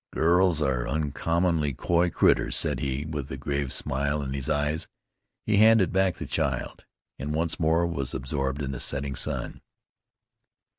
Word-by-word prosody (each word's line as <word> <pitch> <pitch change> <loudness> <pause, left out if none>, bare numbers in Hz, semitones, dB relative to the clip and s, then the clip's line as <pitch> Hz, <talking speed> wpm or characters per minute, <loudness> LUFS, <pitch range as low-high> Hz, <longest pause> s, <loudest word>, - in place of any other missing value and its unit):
"Girls 85 -1 +3
are 65 -4 0
uncommon 80 +1 0
coy 85 +4 +1
critters," - - +2
said - - 0
he, 70 +2 -2
with 75 -3 -5
a - - -4
grave 70 -2 -2
smile 70 +2 -1
in 65 -1 -4
his 70 -2 -4
eyes. 75 +2 0 0.6
He 105 -2 +2
handed 110 -3 +5
back 95 -1 +2
the - - -6
child, - - -2 0.3
and 75 +3 -3
once 80 +2 -1
more 80 +1 +2
was 70 -8 -3
absorbed 70 +2 -2
in 70 - -3
the 65 - -5
setting 70 -1 -1
sun. - - -3
75 Hz, 155 wpm, -26 LUFS, 70-85 Hz, 0.6 s, handed